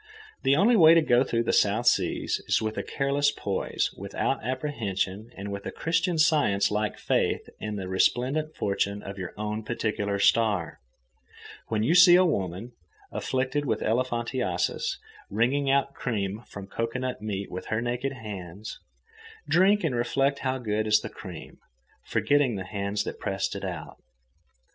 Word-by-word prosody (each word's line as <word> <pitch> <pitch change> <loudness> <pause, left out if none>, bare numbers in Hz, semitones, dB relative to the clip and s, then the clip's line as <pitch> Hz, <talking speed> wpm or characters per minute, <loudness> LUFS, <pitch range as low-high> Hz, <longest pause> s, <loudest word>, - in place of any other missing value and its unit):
The 135 +1 +3
only 205 +10 +4
happy - - +5
way 160 -1 +9
to 165 - +6
go 125 -3 +4
through 115 -3 0
the - - 0
South 105 +4 +2
Seas - - +1
is - - +3
with 110 0 -3
a - - -1
careless 140 +1 +1
poise, 100 -8 -2
without - - -2
apprehension, 115 -6 -2
and 100 +1 -5
with 100 0 -5
a - - -4
Christian 165 +1 0
Science 145 - +3
like 105 0 -1
faith - - 0
in 105 -1 -4
the 95 -2 -4
resplendent 130 +11 +1
fortune 100 0 -1
of 100 0 -7
your 95 - -5
own 105 +1 -3
particular 105 -3 -2
star. 100 -4 +2 0.9
When 110 -1 0
you 135 - +3
see 180 0 +8
a 185 +1 +6
woman, 100 - -2 0.4
afflicted 130 +3 -1
with 110 -5 -1
elephantiasis 120 -5 -1 0.3
wringing 130 +7 +1
out 140 0 +2
cream 105 -3 -3
from 100 -1 -8
cocoanut 115 +5 -3
meat 100 -2 -4
with 90 - -6
her 110 - 0
naked 125 +3 -2
hands, 105 -4 -8 0.7
drink 195 +3 +4
and 155 -5 0
reflect 135 +4 +1
how 130 -1 -1
good 110 -3 -1
is 105 0 +4
the - - -6
cream, - - -10 0.5
forgetting 145 -5 +2
the 95 -1 -5
hands 100 +1 -2
that - - -6
pressed - - -2
it - - -6
out. - - -6
115 Hz, 160 wpm, -27 LUFS, 100-135 Hz, 0.9 s, way